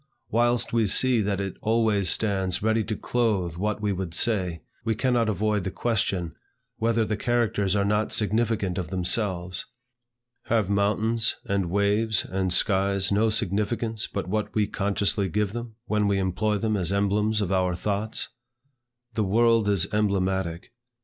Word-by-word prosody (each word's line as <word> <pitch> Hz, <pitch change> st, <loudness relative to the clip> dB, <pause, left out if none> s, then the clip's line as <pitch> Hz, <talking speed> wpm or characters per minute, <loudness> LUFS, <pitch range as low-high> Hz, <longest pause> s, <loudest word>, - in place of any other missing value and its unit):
Whilst 120 Hz, +1 st, +1 dB
we 115 Hz, -2 st, +2 dB
see 125 Hz, +3 st, +4 dB
that 100 Hz, -1 st, -1 dB
it 100 Hz, -1 st, -4 dB
always 110 Hz, -4 st, +2 dB
stands 95 Hz, -3 st, +1 dB
ready 110 Hz, 0 st, +2 dB
to 110 Hz, +1 st, -3 dB
clothe 105 Hz, -9 st, -1 dB
what 105 Hz, +3 st, -2 dB
we 105 Hz, -1 st, +1 dB
would 90 Hz, -3 st, -3 dB
say, 90 Hz, -8 st, +1 dB, 0.2 s
we 110 Hz, -1 st, 0 dB
cannot 120 Hz, -1 st, +1 dB
avoid 105 Hz, 0 st, 0 dB
the 95 Hz, -, -2 dB
question, 95 Hz, -6 st, -1 dB, 0.4 s
whether 115 Hz, 0 st, +1 dB
the 110 Hz, -, -1 dB
characters 105 Hz, -4 st, 0 dB
are 100 Hz, -1 st, +1 dB
not 105 Hz, +1 st, 0 dB
significant 105 Hz, -3 st, 0 dB
of 85 Hz, -4 st, -4 dB
themselves. 90 Hz, -1 st, -1 dB, 0.8 s
Have 110 Hz, -4 st, +1 dB
mountains, 110 Hz, +3 st, +1 dB
and 100 Hz, -3 st, -1 dB
waves, 100 Hz, +3 st, +1 dB
and 95 Hz, -1 st, -2 dB
skies, 95 Hz, +1 st, +2 dB
no 110 Hz, +3 st, +3 dB
significance 110 Hz, +1 st, -1 dB
but 100 Hz, -, -4 dB
what 105 Hz, +3 st, -2 dB
we 105 Hz, -1 st, +3 dB
consciously 100 Hz, -1 st, 0 dB
give 105 Hz, +2 st, -1 dB
them, 120 Hz, -1 st, -6 dB
when 105 Hz, -2 st, +1 dB
we 100 Hz, -1 st, +1 dB
employ 95 Hz, +3 st, 0 dB
them 110 Hz, +1 st, -1 dB
as 90 Hz, -4 st, +1 dB
emblems 105 Hz, +2 st, +1 dB
of 100 Hz, -3 st, -1 dB
our 90 Hz, -2 st, +1 dB
thoughts? 105 Hz, +4 st, -3 dB, 0.8 s
The 110 Hz, -, 0 dB
world 115 Hz, +1 st, +3 dB
is 100 Hz, -3 st, +2 dB
emblematic. 95 Hz, -4 st, -1 dB
105 Hz, 155 wpm, -25 LUFS, 95-110 Hz, 0.8 s, see